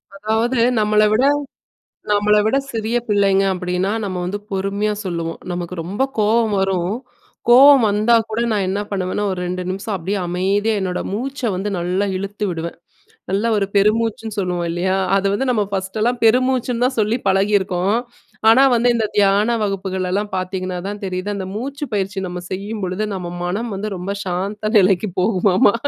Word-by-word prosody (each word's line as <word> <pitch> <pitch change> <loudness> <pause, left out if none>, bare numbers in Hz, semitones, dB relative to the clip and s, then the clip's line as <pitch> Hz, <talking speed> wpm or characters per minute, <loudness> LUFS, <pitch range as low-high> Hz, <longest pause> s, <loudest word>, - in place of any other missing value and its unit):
அதாவது 220 +4 0 0.2
நம்மள 210 0 +3
விட, 235 +5 +3 0.9
நம்மள 210 +1 +3
விட 240 - +2 0.2
சிறிய 225 +1 -1
பிள்ளைங்க 200 -2 +3
அப்டின்னா 180 +1 -1
நம்ம 190 -2 -3
வந்து 200 +3 -3
பொறுமையா 200 +2 -1
சொல்லுவோம். 170 -3 -4
நமக்கு 175 0 -4
ரொம்ப 200 +8 -2 0.2
கோவம் 215 0 +2
வரும். 190 0 0 0.5
கோவம் 270 +2 +8
வந்தா 210 +3 +3
கூட 220 +1 -2
நான் 200 -3 0
என்ன 195 +2 -1
பண்ணுவேன்னா 190 +1 -2
ஒரு 185 - -3
2 180 +1 -3
நிமிஷம் 195 +3 -3
அப்டியே 195 +2 -2
அமைதியா 195 +5 0
என்னோட 185 -1 -2
மூச்ச 265 +6 -4 0.2
வந்து 200 +3 -2
நல்லா 180 +3 0
இழுத்து 200 +2 -4
விடுவேன். 170 0 -5 0.5
நல்லா 200 +4 0
ஒரு 200 - +1
பெருமூச்சுன்னு 220 +1 +1
சொல்லுவோம் 180 -2 -1
இல்லையா? 185 +2 0 0.2
அத 195 - +1
வந்து 260 +6 -1
நம்ம 215 -4 +1
ஃபர்ஸ்ட் 190 +2 -3
எல்லாம் 240 +3 +1
பெருமூச்சுன்னு 250 +1 +2
தான் 260 -1 -1
சொல்லி 215 +3 +1
பழகி 195 +2 +2
இருக்கோம். 190 +2 0 0.5
ஆனா 245 +4 +6
வந்து 240 +1 +3
இந்த 230 -2 0
தியான 205 +3 +3
வகுப்புகள்லலாம் 195 0 -2
பார்த்தீங்கன்னாதான் 185 +1 -4
தெரியுது, 185 +1 -3
அந்த 190 - -4
மூச்சு 280 +6 -4
பயிற்சி 195 -1 -2
நம்ம 180 0 -5
செய்யும் 205 +4 -4
பொழுது 185 +3 -2
நம்ம 185 -3 -4
மனம் 200 +7 -2
வந்து 200 +2 -4
ரொம்ப 185 +2 -4
சாந்த 200 +4 -3
நிலைக்கு 195 +1 +3
போகுமாமா. 190 0 +3
200 Hz, 160 wpm, -19 LUFS, 185-215 Hz, 0.9 s, கோவம்